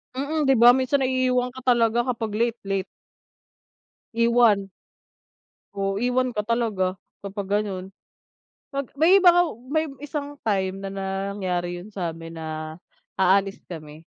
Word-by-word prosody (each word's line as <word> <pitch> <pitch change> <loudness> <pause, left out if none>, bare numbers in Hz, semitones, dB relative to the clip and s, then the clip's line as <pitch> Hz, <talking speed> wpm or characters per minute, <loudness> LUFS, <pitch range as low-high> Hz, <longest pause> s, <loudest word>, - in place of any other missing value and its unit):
Mm, 295 +3 -1
di 270 - +5
ba 240 +1 +8
minsan 260 +2 +1
naiiwan 255 -1 +1
ka 260 - -10
talaga 235 -1 +3
kapag 230 -3 -2
late, 235 +1 0
late. 195 -1 -1 1.3
Iwan. 230 -4 +3 1.1
O 195 0 -1
iwan 250 +1 +1
ka 210 -2 -2
talaga 215 -6 0 0.3
kapag 200 0 -5
gano'n. 190 -3 -5 0.8
Pag 275 -1 -4
may 340 +6 +6
iba 370 -2 +7
nga 350 0 +5 0.3
may 315 +2 +1 0.2
isang 290 0 -5
time 190 -2 0
na 195 - -5 0.4
nangyari 175 -3 -3
'yon 205 - -12
sa'min 165 -3 -5
na 155 0 -6 0.4
aalis 195 +1 +2
kami 155 -2 -10
220 Hz, 130 wpm, -24 LUFS, 190-255 Hz, 1.3 s, ba